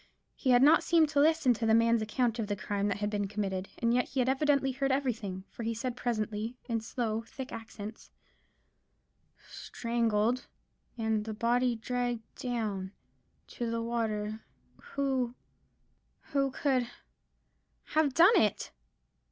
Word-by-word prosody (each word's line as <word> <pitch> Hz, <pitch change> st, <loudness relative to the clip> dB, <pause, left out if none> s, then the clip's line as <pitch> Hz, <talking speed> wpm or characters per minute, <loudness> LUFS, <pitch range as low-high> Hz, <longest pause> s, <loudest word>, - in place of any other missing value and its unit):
He 265 Hz, -, -2 dB
had 245 Hz, 0 st, +6 dB
not 305 Hz, +3 st, +7 dB
seemed 325 Hz, -3 st, +4 dB
to 285 Hz, -, +1 dB
listen 305 Hz, -3 st, +4 dB
to 230 Hz, 0 st, -3 dB
the 220 Hz, -, +5 dB
man's 230 Hz, 0 st, +4 dB
account 235 Hz, +2 st, 0 dB
of 220 Hz, -, -1 dB
the 205 Hz, -, -1 dB
crime 200 Hz, 0 st, -2 dB
that 205 Hz, -, -1 dB
had 205 Hz, 0 st, -2 dB
been 205 Hz, -1 st, -1 dB
committed, 195 Hz, -2 st, -3 dB
and 235 Hz, 0 st, +1 dB
yet 250 Hz, 0 st, +1 dB
he 270 Hz, -, -2 dB
had 250 Hz, -, +2 dB
evidently 275 Hz, 0 st, +2 dB
heard 275 Hz, +1 st, -1 dB
everything; 225 Hz, -9 st, -2 dB
for -, -, -9 dB
he 230 Hz, 0 st, -2 dB
said 240 Hz, +2 st, -3 dB
presently, 225 Hz, -1 st, -2 dB
in 230 Hz, -2 st, -1 dB
slow, 225 Hz, -1 st, -2 dB
thick 255 Hz, +3 st, -8 dB
accents,— 220 Hz, -1 st, -8 dB, 1.4 s
"Strangled—and 225 Hz, -1 st, -2 dB
the 220 Hz, -1 st, -4 dB
body 240 Hz, +2 st, +2 dB
dragged 245 Hz, 0 st, -2 dB, 0.2 s
down—to 220 Hz, 0 st, -5 dB
the 230 Hz, 0 st, -2 dB
water 220 Hz, -2 st, -2 dB, 0.6 s
Who—who 275 Hz, +1 st, -4 dB
could—have 270 Hz, +2 st, -3 dB
done 370 Hz, +6 st, +7 dB
it?" 210 Hz, -2 st, 0 dB
235 Hz, 135 wpm, -30 LUFS, 215-255 Hz, 1.4 s, not